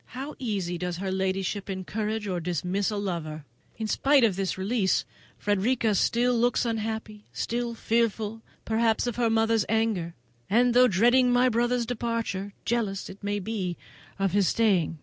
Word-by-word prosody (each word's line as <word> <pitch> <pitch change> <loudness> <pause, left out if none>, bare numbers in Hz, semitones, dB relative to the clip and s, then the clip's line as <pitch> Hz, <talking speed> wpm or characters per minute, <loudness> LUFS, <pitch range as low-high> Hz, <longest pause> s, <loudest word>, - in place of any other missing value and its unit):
How 280 +3 -5
easily 195 -8 -2
does 180 -1 -3
her 190 +1 -3
ladyship 190 +1 -2
encourage 210 +3 -3
or 180 -2 -1
dismiss 180 +4 -1
a 210 - -3
lover! 160 -6 -4 0.3
In 220 - -3
spite 275 +5 +3
of 215 -5 +3
this 190 -1 -2
release, 195 0 +1 0.3
Frederica 215 +3 +1
still 240 +5 +2
looks 245 +1 +2
unhappy: 220 -2 -3
still 235 0 -2
fearful, 225 -1 0 0.2
perhaps, 225 0 +1
of 240 -2 -3
her 235 -2 +2
mother's 225 -1 +2
anger; 215 -7 0 0.3
and 240 +3 +4
though 250 +1 +7
dreading 245 +5 +4
my 250 +1 +4
brother's 240 +1 +1
departure, 230 -4 -3
jealous, 215 -6 -1
it 195 +2 -14
may 205 0 -1
be, 190 -3 -3 0.4
of 195 -1 +1
his 200 -1 +3
staying. 190 -8 +2
215 Hz, 155 wpm, -27 LUFS, 190-235 Hz, 0.4 s, though